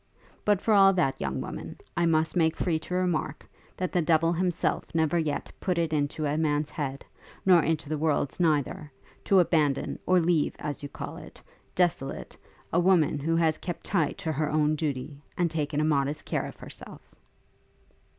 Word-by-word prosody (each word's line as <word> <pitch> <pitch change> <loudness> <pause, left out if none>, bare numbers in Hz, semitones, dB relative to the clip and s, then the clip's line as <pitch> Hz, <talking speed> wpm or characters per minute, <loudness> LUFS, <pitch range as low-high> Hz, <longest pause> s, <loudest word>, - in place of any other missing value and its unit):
But 205 -2 +2
for 220 - +2
all 195 -1 +7
that, 160 -8 0
young 65 -1 -2
woman, - - -7 0.2
I 170 0 +2
must 160 0 +2
make 160 -2 +2
free 165 -3 0
to 180 +3 -5
remark, 175 -5 -1 0.3
that 185 -1 -2
the 180 - +2
devil 165 +1 +3
himself 175 -1 -1
never 160 +1 +2
yet 150 -3 -2
put 180 -2 -1
it 165 -2 0
into 150 +1 -1
a 150 +2 0
man's 150 -1 0
head, 140 -2 -4 0.4
nor 180 -3 +6
into 160 -2 -1
the 155 0 -2
world's 150 -1 0
neither, 150 -2 0 0.3
to 195 - +5
abandon, 155 -5 +1
or 185 0 +5
leave, 165 -3 +1
as 145 -2 -5
you 145 - -6
call - - -7
it, - - -12 0.4
desolate, 165 -6 -1 0.4
a 170 - +4
woman 175 -5 +3
who 165 +4 0
has 160 -2 +2
kept 175 -2 -5
tight 170 -6 0
to 160 - -3
her 155 0 -1
own 150 0 +2
duty, 145 -2 -4 0.2
and 175 -3 +1
taken 150 -2 -1
a - - +2
modest 145 -1 0
care - - -2
of - - -11
herself.' - - -11
160 Hz, 180 wpm, -27 LUFS, 150-175 Hz, 0.4 s, all